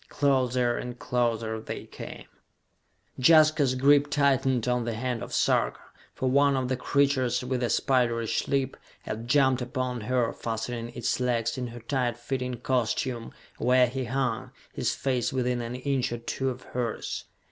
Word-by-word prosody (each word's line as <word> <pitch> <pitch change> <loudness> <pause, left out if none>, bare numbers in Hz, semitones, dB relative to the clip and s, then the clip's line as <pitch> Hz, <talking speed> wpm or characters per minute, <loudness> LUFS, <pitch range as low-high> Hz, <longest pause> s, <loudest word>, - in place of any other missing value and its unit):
Closer 130 -3 +2
and 125 0 -6
closer 115 -3 -1
they - - -6
came. - - -9 0.9
Jaska's 155 -1 +5
grip 145 +2 +4
tightened 135 -4 +2
on 125 -1 +1
the 115 -1 -3
hand 120 0 -2
of - - -7
Sarka, - - +1 0.4
for 130 - -1
one 140 +2 +4
of 130 -1 -1
the 130 - +1
creatures, 130 -1 +1
with 125 0 -2
a 120 - 0
spiderish 120 -4 +1
leap, 135 -1 0 0.3
had 115 +2 -5
jumped 130 -1 +3
upon 125 -1 -3
her, 120 +1 0
fastening 115 +1 -4
its 120 0 -1
legs 115 -2 0
in 125 -1 -3
her 120 0 -9
tight 120 -1 -1
fitting 125 +1 -3
costume, 120 -1 -1 0.3
where 125 0 +5
he 130 +1 -3
hung, 125 -2 -1 0.2
his - - -1
face 125 -4 0
within 125 -2 0
an 120 +1 -4
inch 130 -1 -1
or 120 - -2
two 130 +3 -2
of 125 0 -6
hers. 120 -3 -4
125 Hz, 160 wpm, -27 LUFS, 120-130 Hz, 0.9 s, Jaska's